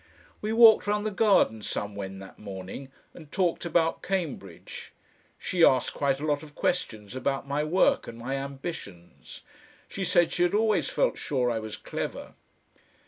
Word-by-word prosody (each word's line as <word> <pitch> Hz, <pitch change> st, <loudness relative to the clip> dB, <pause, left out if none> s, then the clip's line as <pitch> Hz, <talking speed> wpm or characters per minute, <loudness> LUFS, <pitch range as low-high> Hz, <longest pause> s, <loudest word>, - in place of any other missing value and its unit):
We 215 Hz, -, -2 dB
walked 225 Hz, -2 st, +7 dB
round 210 Hz, 0 st, 0 dB
the 215 Hz, -, 0 dB
garden 195 Hz, -, +3 dB
somewhen 100 Hz, -2 st, -4 dB
that 95 Hz, 0 st, -12 dB
morning, 100 Hz, +6 st, -8 dB, 0.2 s
and 155 Hz, -4 st, -13 dB
talked 180 Hz, -3 st, 0 dB
about 165 Hz, -1 st, +1 dB
Cambridge. 150 Hz, -, -5 dB, 0.4 s
She 175 Hz, -2 st, 0 dB
asked 130 Hz, -5 st, +4 dB
quite 140 Hz, -1 st, 0 dB
a 150 Hz, -, -3 dB
lot 145 Hz, -2 st, 0 dB
of 150 Hz, -2 st, -13 dB
questions 110 Hz, -, -2 dB
about 135 Hz, +1 st, -2 dB
my 145 Hz, +2 st, 0 dB
work 170 Hz, +5 st, +2 dB
and 115 Hz, -, -8 dB
my 125 Hz, +3 st, -4 dB
ambitions. 135 Hz, -, -7 dB, 0.5 s
She 195 Hz, -, -5 dB
said 175 Hz, -1 st, +3 dB
she -, -, -2 dB
had 175 Hz, +2 st, +3 dB
always 220 Hz, -, +2 dB
felt -, -, 0 dB
sure 130 Hz, -6 st, 0 dB
I 115 Hz, -, -1 dB
was 110 Hz, -1 st, -6 dB
clever. -, -, -5 dB
145 Hz, 160 wpm, -27 LUFS, 110-185 Hz, 0.5 s, walked